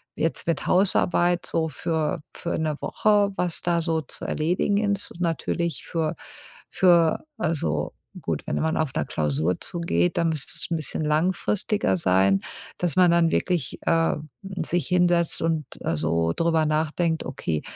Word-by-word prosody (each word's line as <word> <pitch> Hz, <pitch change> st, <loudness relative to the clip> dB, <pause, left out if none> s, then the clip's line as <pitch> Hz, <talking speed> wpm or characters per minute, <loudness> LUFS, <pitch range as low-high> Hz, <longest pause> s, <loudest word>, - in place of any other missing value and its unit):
jetzt 165 Hz, -, -1 dB
mit 165 Hz, -4 st, 0 dB
Hausarbeit 180 Hz, -2 st, +3 dB
so 160 Hz, -1 st, 0 dB
für 155 Hz, +2 st, -2 dB
für 170 Hz, -, -3 dB
'ne 155 Hz, -2 st, -1 dB
Woche, 205 Hz, -2 st, +2 dB
was 175 Hz, -2 st, -1 dB
da 170 Hz, -1 st, +1 dB
so 160 Hz, -1 st, 0 dB
zu 140 Hz, -, -6 dB
erledigen 175 Hz, +6 st, 0 dB, 0.2 s
ist 200 Hz, -, -5 dB
und 175 Hz, -, -10 dB
natürlich 170 Hz, -1 st, -1 dB
für 160 Hz, -3 st, -1 dB, 0.5 s
für 170 Hz, -3 st, +4 dB
also 110 Hz, -, -1 dB, 0.3 s
gut, -, -, -3 dB
wenn -, -, -1 dB
man 160 Hz, +1 st, 0 dB
auf 155 Hz, -4 st, 0 dB
'ner -, -, -1 dB
Klausur 80 Hz, +3 st, 0 dB
zugeht, 90 Hz, -, 0 dB
dann 170 Hz, -, +2 dB
müsste 155 Hz, -3 st, -2 dB
es -, -, -3 dB
'n -, -, +2 dB
bisschen 155 Hz, 0 st, -3 dB
langfristiger 180 Hz, -, +1 dB
sein, 95 Hz, +2 st, +3 dB, 0.4 s
dass 175 Hz, -5 st, 0 dB
man 180 Hz, -1 st, +6 dB
dann 170 Hz, -1 st, +3 dB
wirklich, 175 Hz, -7 st, -1 dB
ähm, 165 Hz, -2 st, +1 dB
sich 175 Hz, -2 st, -2 dB
hinsetzt 175 Hz, -2 st, +2 dB
und, 160 Hz, -2 st, 0 dB, 0.2 s
äh, 80 Hz, -, -1 dB
so 80 Hz, +2 st, +1 dB
drüber 165 Hz, -1 st, +2 dB
nachdenkt: 160 Hz, +2 st, 0 dB
„Okay, 80 Hz, -, -3 dB
165 Hz, 155 wpm, -25 LUFS, 150-175 Hz, 0.5 s, man